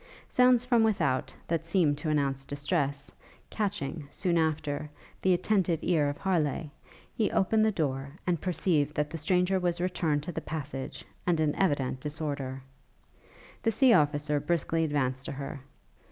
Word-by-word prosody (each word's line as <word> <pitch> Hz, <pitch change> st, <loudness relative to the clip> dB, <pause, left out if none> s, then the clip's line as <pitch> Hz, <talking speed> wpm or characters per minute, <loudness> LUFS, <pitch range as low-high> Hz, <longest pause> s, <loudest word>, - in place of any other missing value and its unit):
Sounds 250 Hz, -1 st, +4 dB
from 240 Hz, -3 st, +4 dB
without, 165 Hz, -12 st, +1 dB, 0.2 s
that 165 Hz, -1 st, 0 dB
seemed 165 Hz, -3 st, +2 dB
to 155 Hz, -, -2 dB
announce 140 Hz, -3 st, 0 dB
distress, 145 Hz, 0 st, -2 dB, 0.4 s
catching, 170 Hz, -8 st, -3 dB
soon 175 Hz, +2 st, 0 dB
after, 155 Hz, -2 st, 0 dB, 0.3 s
the 190 Hz, -, +3 dB
attentive 180 Hz, -2 st, +2 dB
ear 155 Hz, -5 st, +2 dB
of 145 Hz, -, -4 dB
Harleigh, 165 Hz, -5 st, 0 dB, 0.4 s
he 220 Hz, -, +1 dB
opened 215 Hz, +3 st, +2 dB
the 220 Hz, -, +3 dB
door, 140 Hz, -4 st, -2 dB
and 175 Hz, -4 st, 0 dB
perceived 160 Hz, -5 st, +1 dB
that 150 Hz, 0 st, -1 dB
the 165 Hz, -, -4 dB
stranger 180 Hz, +4 st, +2 dB
was 175 Hz, -1 st, 0 dB
returned 165 Hz, -5 st, 0 dB
to 175 Hz, -, -4 dB
the -, -, -4 dB
passage, 145 Hz, -4 st, -6 dB, 0.2 s
and 170 Hz, -2 st, +2 dB
in 155 Hz, -2 st, +2 dB
evident 140 Hz, -9 st, +1 dB
disorder. 140 Hz, -3 st, -4 dB, 1.0 s
The 225 Hz, -, +2 dB
sea 245 Hz, +3 st, +5 dB
officer 145 Hz, -2 st, +2 dB
briskly 165 Hz, +1 st, 0 dB
advanced 130 Hz, -4 st, -1 dB
to -, -, -4 dB
her. 140 Hz, +1 st, -6 dB
155 Hz, 155 wpm, -29 LUFS, 145-180 Hz, 1.0 s, sea